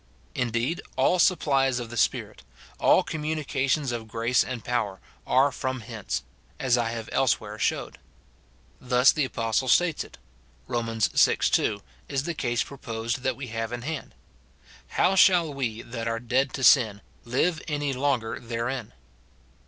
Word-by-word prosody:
Indeed, 125 +5 -1
all 155 +7 +3
supplies 135 -8 +3
of 120 -2 -5
the - - -6
Spirit, 110 - 0 0.4
all - - +5
communica 150 -3 -2
tions 140 -3 +1
of 115 -2 -5
grace 115 +2 +1
and 120 -4 -6
power, 110 -6 -1 0.3
are 135 +2 +4
from 130 -1 -3
hence; 110 -2 -4 0.4
as 130 -2 +2
I 120 -2 0
have 115 -1 -5
elsewhere 110 -4 0
showed. - - -1 0.4
* 65 +1 -33
Thus 125 +1 +5
the 150 -3 0
apostle 115 0 -1
states 170 +5 +3
it; - - -15 0.5
Rom. 120 -2 -2
vi. 90 -7 +4
2, 100 -1 +1 0.3
is 135 -1 -1
the 170 +2 -3
case 120 -6 0
proposed 115 -3 -4
that 130 0 0
we 135 -3 -7
have 115 0 -3
in 120 0 -5
hand: 155 0 -5 0.4
" - - -25
How 190 - +4
shall 180 -5 +5
we, 120 -5 -3
that 115 -1 -5
are 115 0 -1
dead 130 +3 +1
to 130 - -4
sin, 110 -6 +5 0.2
live 155 +7 0
any 145 -2 -1
longer 130 -4 -1
therein?" 115 0 -4
125 Hz, 160 wpm, -26 LUFS, 115-140 Hz, 0.5 s, all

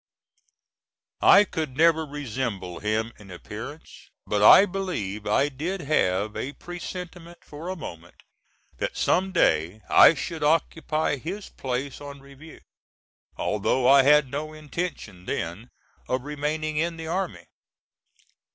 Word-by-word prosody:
I 200 - +8
could 155 -8 -5
never 160 -1 +4
resemble 120 -10 -4
him 110 +2 -1
in 100 -2 -14
appearance, 110 - -10 0.2
but 105 -1 -1
I 150 - +9
believe 175 - -4
I 135 +7 +3
did 165 +7 -4
have 105 - 0
a 140 - -4
presentiment 175 0 -8
for 155 +4 -8
a 185 - -3
moment 85 - -10 0.6
that - - -3
some 190 +1 +1
day 85 - +2
I - - +8
should 160 +3 -5
occupy 155 -1 +1
his 185 +9 -6
place 130 +1 -4
on 140 -1 -9
review 140 +3 -14 0.8
although 110 +5 0
I 135 +1 +8
had 145 -1 +4
no 155 +2 -4
intention 150 - -6
then 90 +9 -4 0.4
of 130 0 -1
remaining 150 +1 -3
in 165 +1 -1
the 165 - -7
army. 180 +3 -3
145 Hz, 125 wpm, -25 LUFS, 110-165 Hz, 0.8 s, I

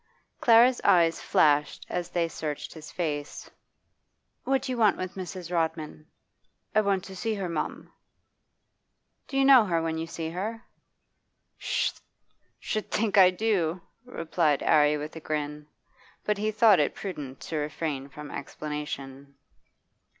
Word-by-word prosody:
Clara's 240 +2 +5
eyes 165 -2 +4
flashed 150 -1 +2
as 180 -1 -3
they 170 -1 0
searched 155 -2 -5
his 155 -2 -11
face. 150 -4 -4 0.9
'What 265 -1 +1
do 260 - -3
you 250 - -2
want 215 -3 +4
with 185 0 -5
Mrs. 185 -2 -7
Rodman?' 160 -2 -2 0.7
'Want 200 -3 +2
to 190 -1 -9
see 220 +3 -2
her, 195 -3 -3
mum.' 165 -3 -4 1.3
'Do 270 - -4
you 270 - +4
know 265 -5 +8
her 170 -4 +1
when 160 0 -2
you 165 - -4
see 165 -1 -5
her?' 220 +7 -4 0.9
'Sh' - - 0 0.7
think 215 -1 0
I 185 -1 +9
do,' 185 -4 0 0.2
replied 165 - 0
'Arry 150 0 +4
with 150 +2 -7
a - - -6
grin. 150 -1 -4 0.6
But 210 -1 0
he 215 +1 0
thought 215 -3 +5
it 145 - +1
prudent 145 -9 -6
to 160 - -4
refrain 150 -2 -3
from 150 +1 -9
explanation. 140 -2 -6
165 Hz, 135 wpm, -27 LUFS, 150-205 Hz, 1.3 s, I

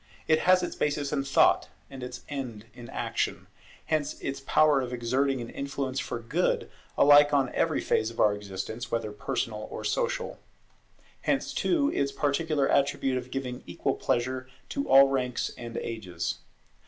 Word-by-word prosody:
It 155 0 +4
has 185 0 +6
its 175 - -3
basis 145 -1 -1
in 140 -2 0
Thought, 135 - +3 0.2
and 135 -1 -10
its 125 0 -7
end 125 -7 -5
is 120 -2 -11
Action. - - -2 0.4
Hence 155 -2 -1
its 135 - -4
power 145 +1 +4
of 125 -1 -4
exerting 130 +2 0
an 120 - -7
influence 140 -1 -3
for - - -3
good 135 +11 0 0.3
alike 145 0 +7
on 135 -3 +1
every - - +1
phase 110 - +1
of 115 - -11
our 105 - +5
existence, 105 +4 -6
whether 115 -2 -2
personal 105 +1 -3
or - - -6
social. - - -1 0.8
Hence - - 0
too 295 -4 +2
its 140 0 0
peculiar 145 0 +1
attribute 135 -2 +2
of 125 0 -10
giving 125 -2 -4
equal - - -1
pleasure 130 +2 -1 0.2
to 280 0 -3
all 135 0 +8
ranks 130 -2 -1
and 115 -1 -7
ages. 95 - -4
135 Hz, 160 wpm, -28 LUFS, 120-145 Hz, 0.8 s, all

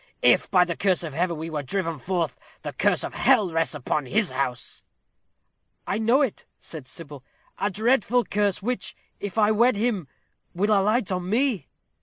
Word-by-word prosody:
if, - - +4
by 180 -2 +5
the 170 -1 -3
curse 185 -3 +1
of 155 -4 -5
Heaven, 170 +2 0
we 160 +1 -5
were 150 -2 -2
driven 165 +1 -2
forth, 175 +2 -1 0.3
the - - -5
curse - - +1
of - - -5
hell 215 -9 +3
rests 165 -1 0
upon 145 0 -2
his 210 - +1
house." 125 -3 -3 1.0
"I 200 - -1
know 240 +6 +4
it," 255 - -4
said 150 -6 -9
Sybil; 145 -3 -8 0.4
"a 205 - +1
dreadful 235 +3 +2
curse, 200 -2 0
which, 250 +3 -2 0.2
if 205 +1 -6
I 215 -1 +4
wed 235 +3 +4
him, 205 - -1 0.5
will 205 +4 +1
alight 210 +1 +2
on 180 0 -2
me." 240 - +1
195 Hz, 175 wpm, -25 LUFS, 165-220 Hz, 1.0 s, by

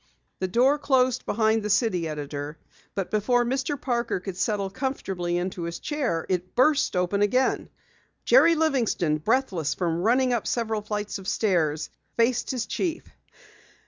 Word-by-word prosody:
The 185 - -1
door 255 +9 +3
closed 255 -3 +2
behind 220 +1 +2
the 210 - -3
city 195 -5 +1
editor, 145 0 -5 0.4
but 195 -2 -3
before 240 +3 +2
Mr. 270 +3 -1
Parker 235 -6 -1
could 185 0 -6
settle 200 0 -1
comfortably 190 -8 -2
into 180 0 -3
his 170 0 -4
chair, 270 - -2
it 185 -1 -2
burst 285 -4 +3
open 180 +3 +1
again. 250 +6 +1 0.6
Jerry 335 -9 +6
Livingston, 240 - +1
breathless 190 - 0
from 170 -2 -1
running 250 +5 +3
up 240 - -1
several 220 -3 -1
flights 210 -1 -4
of 190 - -10
stairs, 165 -8 0 0.3
faced 240 +1 +2
his 250 -3 -2
chief. 335 -3 -2
215 Hz, 145 wpm, -25 LUFS, 180-255 Hz, 0.6 s, Jerry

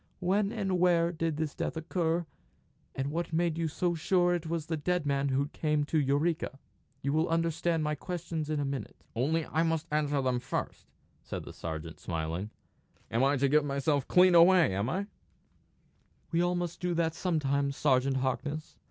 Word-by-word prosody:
When 195 +3 +1
and 195 -5 -1
where 170 -1 +3
did 165 -2 -2
this 155 -2 -2
death - - -3
occur, 165 +1 0 0.7
and 135 +1 -2
what 170 +2 -2
made 165 0 +1
you 165 - +1
so 175 +3 0
sure 175 +1 +2
that 175 -2 -2
it - - -5
was 165 -2 -2
the 160 - -2
dead 175 +2 -1
man 140 0 +1
who 140 +2 0
came 150 -2 0
to 155 +2 +1
Eureka? 145 +1 0 0.5
You 140 - 0
will 160 +2 +2
understand 165 0 +1
my 150 0 0
questions 165 -1 -4
in 155 -1 0
a 145 - 0
minute." 135 -1 -4 0.2
"Only 155 +7 +1
I 160 - 0
must 165 -1 0
answer 145 -1 +1
them 125 -1 +1
first," 125 +2 -4 0.3
said - - -6
the - - -9
sergeant, 80 0 -6
smiling. 85 +4 -3 0.6
"I - - -15
am 135 +3 +3
to 140 +1 +2
give 150 +2 +4
myself 140 0 0
clean 180 0 +6
away, 175 - +6
am 100 +5 -1
I?" 190 +7 -1 1.3
"We 165 - +1 0.2
must 175 0 -4
all 180 - +1
do 175 - 0
that 165 -1 +1
sometimes, 140 -5 0
Sergeant 135 -1 +2
Harkness. 145 +4 -3
155 Hz, 185 wpm, -30 LUFS, 140-170 Hz, 1.3 s, clean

